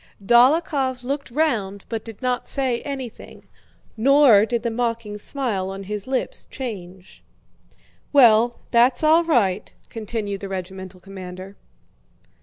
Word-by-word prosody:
Dólokhov 260 - +3
looked 275 +2 -4
round 230 -9 -1
but 225 -2 -4
did 225 +2 -11
not 250 -1 -1
say 260 -4 0
anything, 265 -5 -8 0.5
nor 240 -3 +5
did 235 -1 -2
the 235 - -1
mocking 230 -3 -3
smile 210 -7 -2
on 195 0 -6
his 205 +2 -5
lips 260 -1 -3
change. 190 -8 -8 0.9
"Well, 235 -3 +5
that's 245 +3 +3
all 320 +2 +5
right," 215 - +1 0.2
continued 215 -3 -4
the 195 - -6
regimental 190 0 -7
commander. 190 0 -9
230 Hz, 120 wpm, -22 LUFS, 195-260 Hz, 0.9 s, nor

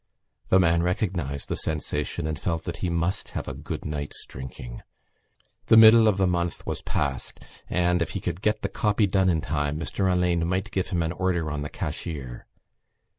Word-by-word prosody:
The 95 - +6
man 85 -2 +3
recognised 85 -6 -1
the - - -2
sensation 75 -1 -2
and 80 -1 -3
felt 85 -2 -2
that - - -5
he 90 - -2
must 85 +2 -1
have - - -4
a - - -3
good - - -6
night's 75 -1 -4
drinking. 60 -2 -8 0.9
The 110 - +7
middle 110 0 +9
of 105 -3 +3
the 95 - +3
month 85 -3 -1
was - - -3
passed 70 -4 -3 0.3
and, 90 0 +2
if 85 - 0
he - - -3
could 90 - -4
get 105 +1 0
the - - +1
copy 105 0 +1
done 95 -1 +2
in 80 -3 +1
time, 75 0 -1
Mr 95 +4 -1
Alleyne 90 -2 +1
might 95 +4 -1
give 95 - -1
him 90 -3 0
an 80 - -1
order 85 -3 -1
on 75 0 -3
the 75 - -4
cashier. 65 -7 -5
85 Hz, 190 wpm, -26 LUFS, 75-95 Hz, 0.9 s, middle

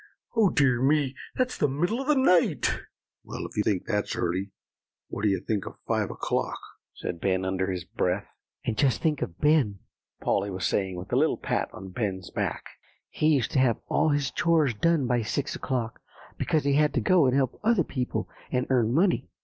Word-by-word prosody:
"Oh, 220 -4 +5
dear 130 -7 +2
me! 140 -1 +2 0.2
that's 255 0 -1
the 145 - +3
middle 175 - -1
of 270 - -6
the 300 - +4
night." 180 -11 +3 0.4
"Well, - - -6
if - - -9
you 105 - +2
think 100 -3 0
that's 105 -3 -1
early, 90 +3 -1 0.6
what - - -5
do 105 - +3
you 95 - +1
think 105 -4 -2
of - - -8
five - - 0
o'clock," - - -2 0.4
said 85 - -5
Ben 95 -1 +1
under 95 0 -1
his 90 -2 -3
breath. 90 +3 -1 0.4
"And 115 - -1
just 130 -5 +3
think 155 -3 0
of 85 - -4
Ben," 145 -10 +3 0.4
Polly 100 +1 0
was 95 -1 -3
saying, 95 -2 0
with 90 +6 -7
a - - +4
little 155 +3 +3
pat - - -1
on 95 0 -9
Ben's 95 -3 -3
back; - - -2 0.5
"he 155 - 0
used 140 -7 +2
to - - +2
have 125 -3 +3
all 155 - +2
his 145 -2 0
chores 160 -6 +2
done 160 +5 +2
by 120 -1 +1
six 120 +6 -2
o'clock, 120 -4 -3 0.3
because 155 - 0
he 140 0 +2
had 150 +1 +3
to - - +3
go 155 +5 +4
and 130 - +2
help 135 -3 0
other 220 -5 +3
people, 130 -4 -3 0.2
and 125 -1 +1
earn 120 -3 +3
money." 175 +2 +2
125 Hz, 200 wpm, -27 LUFS, 100-150 Hz, 0.6 s, Oh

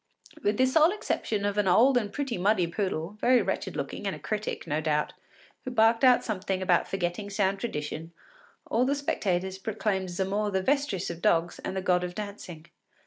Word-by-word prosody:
With 205 -4 +1
the 260 - +4
sole 310 +5 +5
exception 220 - -2
of 205 0 0
an 205 - +1
old 245 +9 +5
and 215 -4 +1
pretty 275 -4 -3
muddy 190 -1 +2
poodle, 185 +1 -3
very 250 0 +5
wretched - - -3
looking, - - -4
and - - -2
a - - -11
critic, 215 0 -3
no 150 +2 -1
doubt, 150 -1 0 0.5
who - - -4
barked 225 0 +3
out 250 -2 +6
something 195 -3 -2
about 180 -2 +2
forgetting 195 +2 -3
sound 195 -1 0
tradition, 160 -5 -4 0.5
all 235 - +1
the 275 +2 +1
spectators 190 -9 -1
proclaimed 195 -2 -2
Zamore 195 +4 -1
the 190 -1 -1
Vestris 265 -9 0
of 170 0 -9
dogs 170 +1 +1
and 190 - -4
the 190 - -2
god 180 -1 +2
of 180 0 -5
dancing. 200 -6 -7
200 Hz, 190 wpm, -28 LUFS, 180-225 Hz, 0.5 s, out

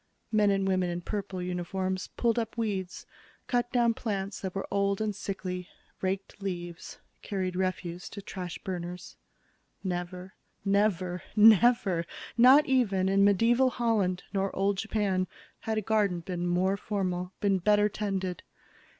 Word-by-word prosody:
Men 210 -2 +4
and 195 -1 +1
women 185 -2 +1
in 175 0 -3
purple 195 -1 -4
uniforms 185 +1 -2
pulled 235 -1 +2
up 225 0 -4
weeds, 195 -5 -3 0.4
cut 245 -1 0
down 235 -2 +3
plants 195 -4 -3
that 190 -1 -4
were 195 - -2
old 200 0 +1
and 215 -2 -1
sickly, 185 -3 -5 0.3
raked 195 +2 -3
leaves, 175 -3 -5 0.2
carried 185 -3 -3
refuse 180 -1 -2
to 200 - -8
trash 180 -3 -6
burners. 180 -1 -5 0.7
Never, 180 0 -4 0.3
never, 190 -3 +1
never 215 -5 +5 0.3
not 260 +5 +7
even 205 -9 +2
in 195 +1 +4
medieval 230 +6 +4
Holland 220 -7 0
nor 195 0 +1
old 195 0 +1
Japan 200 -4 0 0.3
had 220 -1 -2
a - - +1
garden 200 -5 +1
been 175 0 -3
more 185 +3 +2
formal, 185 -3 -2
been 195 -2 +2
better 210 +2 +4
tended. 195 -4 -3
195 Hz, 140 wpm, -29 LUFS, 180-210 Hz, 0.7 s, not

